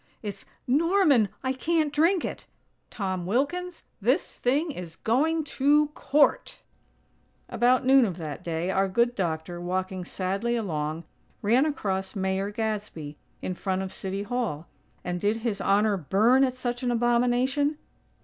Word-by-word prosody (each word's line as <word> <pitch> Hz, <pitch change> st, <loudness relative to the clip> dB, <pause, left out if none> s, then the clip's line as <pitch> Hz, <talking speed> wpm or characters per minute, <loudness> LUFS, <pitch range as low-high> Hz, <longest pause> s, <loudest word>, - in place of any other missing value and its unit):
It's 200 Hz, -2 st, -6 dB, 0.2 s
'Norman! 295 Hz, -, +3 dB
I 260 Hz, 0 st, 0 dB
can't 310 Hz, +2 st, 0 dB
drink 335 Hz, +5 st, +3 dB
it'! -, -, -6 dB, 0.4 s
Tom 185 Hz, -4 st, -3 dB
Wilkins, 335 Hz, -, -1 dB, 0.2 s
this 255 Hz, -, +1 dB
thing 290 Hz, +6 st, +1 dB
is 175 Hz, -, -8 dB
going 310 Hz, -, +1 dB
to 295 Hz, +1 st, +2 dB
court!!" 295 Hz, 0 st, +2 dB, 0.9 s
About 250 Hz, +1 st, +2 dB
noon 265 Hz, 0 st, +6 dB
of 185 Hz, -5 st, -3 dB
that 155 Hz, -1 st, -6 dB
day, 170 Hz, +2 st, -2 dB
our 195 Hz, 0 st, +2 dB
good 235 Hz, +5 st, +2 dB
doctor, 175 Hz, -3 st, -3 dB
walking 185 Hz, +1 st, -2 dB
sadly 195 Hz, +7 st, -2 dB
along, 160 Hz, -7 st, -2 dB, 0.4 s
ran 245 Hz, +8 st, +4 dB
across 195 Hz, -10 st, -2 dB
Mayor 190 Hz, 0 st, -1 dB
Gadsby, 205 Hz, -9 st, -4 dB, 0.2 s
in 185 Hz, -, -2 dB
front 190 Hz, +1 st, -2 dB
of 190 Hz, -, -6 dB
City 195 Hz, +1 st, -4 dB
Hall; 220 Hz, -9 st, -3 dB, 0.4 s
and 180 Hz, 0 st, -3 dB
did 210 Hz, +2 st, +1 dB
His 205 Hz, -4 st, -1 dB
Honor 205 Hz, +1 st, +3 dB
"burn" 215 Hz, -, +3 dB
at 255 Hz, -1 st, +1 dB
such 245 Hz, -1 st, -3 dB
an 250 Hz, -, 0 dB
abomination? 245 Hz, +5 st, +2 dB
220 Hz, 140 wpm, -26 LUFS, 190-265 Hz, 0.9 s, noon